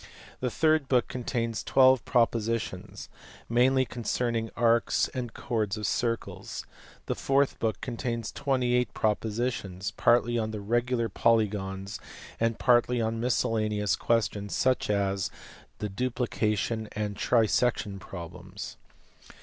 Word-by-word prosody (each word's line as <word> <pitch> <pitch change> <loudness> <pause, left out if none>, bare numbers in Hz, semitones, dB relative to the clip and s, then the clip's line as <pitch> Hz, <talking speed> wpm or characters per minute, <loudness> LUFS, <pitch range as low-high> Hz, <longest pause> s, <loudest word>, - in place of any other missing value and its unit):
The 125 - 0
third 155 +1 +2
book 125 -3 +3
contains 115 -3 -2
12 130 -2 +5
propositions, 115 -5 0 0.4
mainly 130 +3 +3
concerning 115 -1 -2
arcs 115 0 +3
and 125 -3 -4
chords 110 -4 -2
of 105 - -3
circles. 115 -2 -2 0.4
The - - -1
fourth 140 0 +1
book 110 -3 -1
contains 115 -2 -3
28 125 -4 0
propo 110 +1 +1
sitions, 100 -5 -3
partly 120 0 +3
011 110 -2 -3
regular 120 0 +1
polygons 100 -2 0 0.4
and 115 0 +1
partly 120 0 +3
on 115 0 -1
miscellaneous 110 -3 +1
questions 105 -3 0
such 130 -3 +1
as 100 -2 0 0.5
the 105 - -3
duplication 110 -1 -1
and 105 -1 -2
trisection 110 -2 +1
problems. 90 +1 -8
115 Hz, 110 wpm, -28 LUFS, 105-125 Hz, 0.5 s, 12